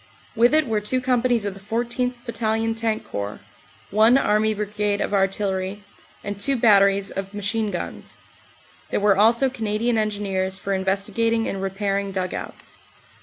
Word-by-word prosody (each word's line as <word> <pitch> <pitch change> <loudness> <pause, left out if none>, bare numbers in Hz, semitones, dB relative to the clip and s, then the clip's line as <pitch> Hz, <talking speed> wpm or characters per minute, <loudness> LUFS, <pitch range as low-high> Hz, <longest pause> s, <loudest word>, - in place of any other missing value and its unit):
With 240 +6 +4
it 310 -1 +3
were 220 -4 -1
two 230 +5 0
com 250 -2 +1
panies 240 -4 +1
of 200 - -2
the 195 - -12
14th. 240 +4 -2
Battalion 225 -1 -1
Tank 225 -1 -2
Corps, 100 +1 -5 0.5
one 220 +5 +5
Army 215 -3 +2
Brigade 210 -1 -1
of - - -2
Artillery, 195 0 -1 0.4
and 200 0 -5
two 275 +3 +3
batteries 200 -4 +4
of 195 +1 -6
machine 210 +2 -1
guns. 180 -3 -6 0.7
There - - 0
were 205 -1 +4
also 230 +6 +4
Canadian 225 -1 -1
Engineers 195 -3 -1
for 195 0 -3
investigating 200 +4 0
and 195 - -3
repairing 195 0 -2
dug 185 -1 -3
outs. - - -8
210 Hz, 155 wpm, -23 LUFS, 195-230 Hz, 0.7 s, one